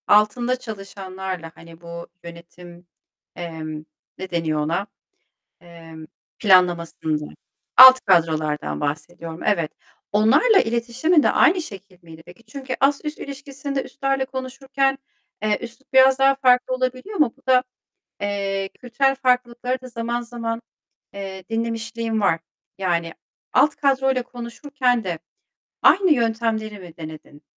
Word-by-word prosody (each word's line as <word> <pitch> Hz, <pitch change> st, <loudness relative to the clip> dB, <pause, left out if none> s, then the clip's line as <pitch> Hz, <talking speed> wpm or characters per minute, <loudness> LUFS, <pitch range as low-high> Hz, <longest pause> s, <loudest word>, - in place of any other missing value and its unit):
Altında 225 Hz, +4 st, +3 dB
çalışanlarla 190 Hz, -5 st, -7 dB
hani 165 Hz, 0 st, -15 dB
bu 170 Hz, 0 st, -8 dB, 0.2 s
yönetim, 170 Hz, +1 st, -13 dB, 0.5 s
emm, 155 Hz, -2 st, -6 dB, 0.3 s
ne 190 Hz, 0 st, -6 dB
deniyor 165 Hz, -3 st, -1 dB
ona, 165 Hz, +7 st, -1 dB, 0.8 s
eee, 170 Hz, -2 st, -13 dB, 0.4 s
planlamasında, 170 Hz, -5 st, +2 dB, 0.5 s
alt 260 Hz, 0 st, +11 dB
kadrolardan 155 Hz, -, +1 dB
bahsediyorum 165 Hz, +2 st, -5 dB
evet. 170 Hz, -7 st, +1 dB, 0.4 s
Onlarla 225 Hz, -, +5 dB
iletişimin 240 Hz, +8 st, +1 dB
de -, -, +3 dB
aynı 360 Hz, 0 st, +4 dB
şekil 195 Hz, -, -11 dB
miydi 165 Hz, -1 st, -13 dB
peki? 180 Hz, +6 st, -16 dB
Çünkü 260 Hz, +3 st, -6 dB
ast 280 Hz, +3 st, +2 dB
üst 300 Hz, 0 st, -4 dB
ilişkisinde 275 Hz, 0 st, -5 dB
üstlerle 275 Hz, -1 st, -1 dB
konuşurken, 270 Hz, +1 st, -2 dB, 0.4 s
eee, 215 Hz, -1 st, +1 dB
üslup 235 Hz, +3 st, -11 dB
biraz 265 Hz, 0 st, +6 dB
daha 270 Hz, 0 st, +5 dB
farklı 255 Hz, -1 st, +3 dB
olabiliyor 255 Hz, -, -3 dB
ama 300 Hz, -9 st, +2 dB
bu -, -, -30 dB
da, 255 Hz, -1 st, +5 dB, 0.6 s
eee, 195 Hz, -1 st, -2 dB
kültürel 270 Hz, +2 st, +1 dB
farklılıkları 250 Hz, -1 st, 0 dB
da 255 Hz, -, -10 dB
zaman 235 Hz, 0 st, -3 dB
zaman, 230 Hz, -1 st, -5 dB, 0.5 s
eee, 190 Hz, -1 st, -7 dB
dinlemişliğim 225 Hz, 0 st, -2 dB
var. 165 Hz, -5 st, +2 dB, 0.4 s
Yani 170 Hz, -3 st, -1 dB, 0.4 s
alt 295 Hz, -, +4 dB
kadroyla 265 Hz, -2 st, +1 dB
konuşurken 245 Hz, 0 st, -2 dB
de 175 Hz, -3 st, -3 dB, 0.6 s
aynı 380 Hz, -3 st, +5 dB
yöntemleri 225 Hz, -3 st, -1 dB
mi 175 Hz, -3 st, -13 dB
denedin? 155 Hz, -2 st, -10 dB
225 Hz, 120 wpm, -22 LUFS, 175-260 Hz, 0.8 s, alt